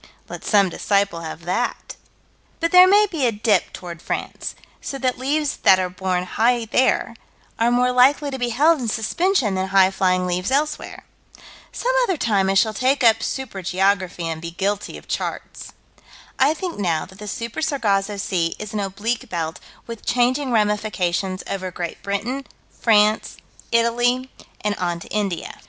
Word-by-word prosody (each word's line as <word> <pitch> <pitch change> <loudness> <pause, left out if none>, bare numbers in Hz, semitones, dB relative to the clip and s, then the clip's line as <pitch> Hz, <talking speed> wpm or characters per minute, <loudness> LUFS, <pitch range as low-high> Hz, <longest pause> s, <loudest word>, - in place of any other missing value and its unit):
Let - - -8
some 200 -3 +3
disciple 200 -1 0
have 160 +1 -7
that. 210 +8 -2 0.6
But 335 -1 0
there 365 0 +9
may 410 +2 +6
be 320 -10 -1
a - - +2
dip 210 -3 +1
toward 170 -2 -9
France, - - -4 0.3
so 275 - -5
that 255 -1 -1
leaves 290 +3 -1
that 190 - +5
are 185 -1 -2
borne 185 -1 -1
high 230 +5 +1
there, 250 +4 +1 0.4
are 230 +1 +3
more 250 +1 +2
likely 280 +3 +4
to 265 - -5
be 245 -1 0
held 300 +7 +3
in 245 - -3
suspension 245 - +1
than 190 0 -2
highflying 185 -1 +3
leaves 180 +2 -1
elsewhere. 295 +3 -2 0.7
Some - - -1
other 385 -9 +1
time 200 -7 +1
I 195 - +1
shall 215 +2 +3
take 260 +4 +1
up 225 -1 +5
Super 245 -8 -4
geography, 185 -1 0
and 160 -1 -4
be 170 - -5
guilty 200 +4 -3
of - - -15
charts. - - -5 0.7
I 285 +4 +4
think, 350 - -5
now, 170 -5 0
that 190 +1 -16
the 210 - -8
Super 230 +6 -4
Sargasso 210 -9 0
Sea 175 -4 -1
is 215 0 -7
an 215 - -1
oblique 215 +5 -3
belt, 165 -1 -3 0.3
with 230 -2 -8
changing 255 +2 +1
ramifications, 205 -4 0
over 190 -1 -3
Great 175 -1 -6
Britain, 230 +8 -3 0.2
France, 215 -1 +2 0.3
Italy, 240 +2 +1 0.3
and 210 0 0
on 175 -1 -1
to - - -10
India. 200 -5 -3
210 Hz, 165 wpm, -21 LUFS, 190-255 Hz, 0.7 s, there